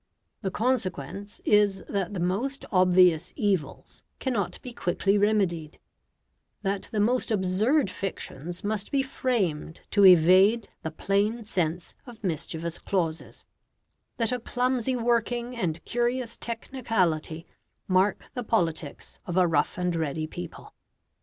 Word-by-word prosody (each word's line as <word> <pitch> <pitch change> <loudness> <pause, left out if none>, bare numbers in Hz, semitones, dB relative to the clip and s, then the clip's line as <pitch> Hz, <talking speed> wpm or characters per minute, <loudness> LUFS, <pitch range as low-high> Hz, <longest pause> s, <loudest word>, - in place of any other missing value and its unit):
The 190 - -1
consequence 200 - -2
is 205 -2 +3
that 200 -2 -2
the - - -2
most 205 +11 -1
obvious 180 -3 +4
evils 190 -9 -2 0.2
cannot 235 -8 -2
be 250 - -7
quickly 195 0 0
remedied; 195 -7 +1 0.9
that 195 0 -2
the 215 - -1
most 245 +5 +1
absurd 210 +5 +2
fictions 175 -2 -5
must 210 0 -2
be 275 -2 +2
framed 195 - -2
to 205 - +4
evade 190 +5 +6
the 160 - -3
plain 200 +8 0
sense 175 -4 -2
of 230 -3 -12
mischievous 165 -1 -3
clauses; 165 -4 -3 0.7
that 230 0 +1
a 250 - -1
clumsy 250 +1 0
working 240 +1 0
and 170 -7 -3
curious 240 0 -1
technicality 190 - -1 0.4
mark 190 +2 +2
the 245 - -3
politics 165 -9 -2
of 175 0 -2
a 185 - +5
rough 155 -4 +1
and 180 -1 0
ready 155 -1 -2
people. 90 - -9
195 Hz, 125 wpm, -27 LUFS, 175-230 Hz, 0.9 s, evade